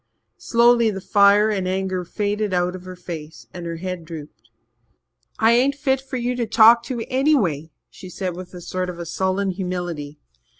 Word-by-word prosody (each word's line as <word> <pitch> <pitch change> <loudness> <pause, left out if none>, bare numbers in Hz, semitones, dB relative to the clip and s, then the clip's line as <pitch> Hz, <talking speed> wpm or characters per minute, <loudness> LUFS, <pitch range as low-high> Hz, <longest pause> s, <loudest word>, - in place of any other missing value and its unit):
Slowly 235 -1 +4
the 195 -2 -4
fire 205 +2 +4
and 190 -3 -1
anger 185 -1 -2
faded 205 +1 -2
out 180 +1 0
of 185 0 -10
her 185 0 -8
face 165 -3 -8
and 175 -2 -7
her 165 - -4
head 180 0 -5
drooped. 150 -8 -11 0.9
"I 225 +1 +4
ain't 260 +4 +3
fit 270 -2 0
for 270 -1 -5
you 245 +1 -1
to 235 -2 -1
talk 225 +2 +6
to 240 -4 -4
anyway," 255 - +1 0.2
she 185 - -11
said 180 -1 -4
with 180 0 -9
a 175 - -8
sort 185 +1 -3
of 170 -1 -7
sullen 190 +3 -1
humility. 175 -5 -5
190 Hz, 175 wpm, -22 LUFS, 175-225 Hz, 0.9 s, talk